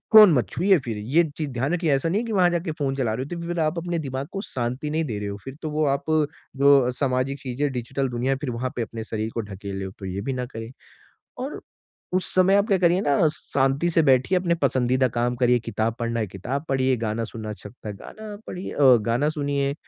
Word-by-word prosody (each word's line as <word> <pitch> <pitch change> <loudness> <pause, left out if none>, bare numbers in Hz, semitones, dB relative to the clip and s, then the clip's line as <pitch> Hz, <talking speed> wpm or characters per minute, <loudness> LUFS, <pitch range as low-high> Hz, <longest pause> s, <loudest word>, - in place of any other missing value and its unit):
Phone 210 -5 +10
मत 125 -5 +2
छुइए 190 +2 +3
फिर, 115 -3 -3
ये 130 +11 +2
चीज़ 155 -3 -2
ध्यान 130 +6 -1
रखिए, 170 -3 +1
ऐसा 135 +5 0
नहीं 200 +6 +1
है - - -5
कि - - -4
वहाँ 180 -3 +4
जाके 170 -1 -1
फ़ोन 140 -3 -2
चला 125 -5 0
रहे 125 +4 -3
हो, 175 - -6
तो 170 0 -6
फिर 175 0 -2
आप 155 +1 +1
अपने 170 0 -2
दिमाग 135 -2 -4
को 195 - -3
शांति 130 - -3
नहीं 160 +2 0
दे 110 -7 -3
रहे 105 - -4
हो, 100 0 -4
फिर 135 0 -8
तो 155 - -3
वो 155 +1 +1
आप - - -18 0.5
जो 140 -2 +5
सामाजिक 130 +1 -1
चीज़ें, 135 +2 -2
डिजिटल 130 +2 -2
दुनिया, 125 +3 0
फिर 145 - -2
वहाँ 125 +2 -3
पे 120 - -2
अपने 115 0 -5
शरीर 110 0 -3
को 115 - 0
ढकेल 100 -1 -6
हो, 95 - -5
तो 95 - -7
ये 95 +1 -3
भी 135 +6 -2
ना 125 -1 -2
करें। 115 -1 -8 0.7
और 265 +4 -5 0.5
उस 185 0 +1
समय 185 +1 +5
आप 200 +1 +3
क्या 200 -4 +3
करिए 175 +1 +3
ना, 145 +1 +3
शांति 140 +2 0
से 165 -1 +3
बैठिए, 135 +6 +4
अपने 175 -2 +1
पसंदीदा 130 -3 +2
काम 120 +1 +1
करिए, 125 0 +3
किताब 115 0 -2
पढ़ना 115 0 -1
है, 110 - -1
किताब 125 - -4
पढ़िए, 130 -1 +2
गाना 115 0 -2
सुनना 110 -1 -7
अच्छा 105 -1 -8
लगता 110 -1 -10
है, 105 - -5
गाना 215 - -9
पढ़िए 180 +1 -5
अ, 135 -3 +6
गाना 125 +6 +2
सुनिए, 140 -2 -1
135 Hz, 240 wpm, -24 LUFS, 120-165 Hz, 0.7 s, फ़ोन